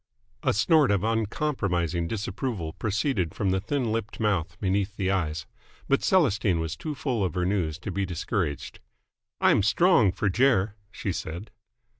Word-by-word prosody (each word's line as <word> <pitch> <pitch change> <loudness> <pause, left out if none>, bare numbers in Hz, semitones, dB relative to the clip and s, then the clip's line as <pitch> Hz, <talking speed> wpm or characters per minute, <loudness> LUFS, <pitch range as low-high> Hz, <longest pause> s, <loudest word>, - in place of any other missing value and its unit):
A - - +2
snort 150 - +4
of 100 -2 +2
uncompromising 100 - 0
disapproval 100 - -3
proceeded 105 - -1
from 100 -3 0
the 95 0 0
thin 125 +1 -1
lipped 110 -1 -3
mouth 90 -6 0
beneath 100 +1 0
the 95 -1 0
eyes. 80 -5 -1 0.4
But 140 - +2
Celestine 105 - +2
was 80 -1 -3
too 150 - -5
full 125 -6 -1
of 95 - -2
her 90 -1 0
news 90 -5 0
to 95 - -6
be 100 +2 -1
discouraged. 85 - -3 0.6
"I'm - - +4
strong 105 - +4
fer 100 - -1
Jer!" 110 -2 +3 0.2
she 100 - -3
said. 85 +4 -6
100 Hz, 155 wpm, -26 LUFS, 90-115 Hz, 0.6 s, snort